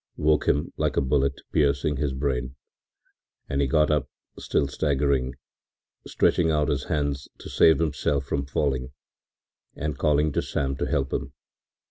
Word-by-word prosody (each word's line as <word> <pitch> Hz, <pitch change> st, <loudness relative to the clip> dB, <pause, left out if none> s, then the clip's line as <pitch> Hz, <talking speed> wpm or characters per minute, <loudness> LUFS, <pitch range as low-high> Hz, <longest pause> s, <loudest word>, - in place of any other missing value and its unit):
” -, -, -55 dB
woke 75 Hz, -1 st, +2 dB
him 75 Hz, -, +1 dB
like -, -, 0 dB
a -, -, +6 dB
bullet 70 Hz, 0 st, 0 dB
piercing 70 Hz, 0 st, +1 dB
his 70 Hz, 0 st, -1 dB
brain, 65 Hz, -1 st, -2 dB, 0.9 s
and 70 Hz, +1 st, -1 dB
he 70 Hz, -, +2 dB
got 75 Hz, +3 st, +3 dB
up, 75 Hz, -2 st, 0 dB, 0.3 s
still 70 Hz, -, 0 dB
staggering, 70 Hz, -2 st, 0 dB, 0.7 s
stretching 85 Hz, -2 st, +2 dB
out 75 Hz, -2 st, +1 dB
his 70 Hz, -2 st, -1 dB
hands 70 Hz, -3 st, -2 dB
to -, -, -10 dB
save 80 Hz, -, +5 dB
himself 75 Hz, -3 st, 0 dB
from 70 Hz, 0 st, -1 dB
falling, 65 Hz, -2 st, -2 dB, 0.8 s
and 75 Hz, -2 st, -4 dB
calling 75 Hz, 0 st, +2 dB
to -, -, 0 dB
Sam 70 Hz, -1 st, -2 dB
to -, -, -2 dB
help 70 Hz, -1 st, -1 dB
him. -, -, -3 dB
70 Hz, 155 wpm, -25 LUFS, 70-75 Hz, 0.9 s, a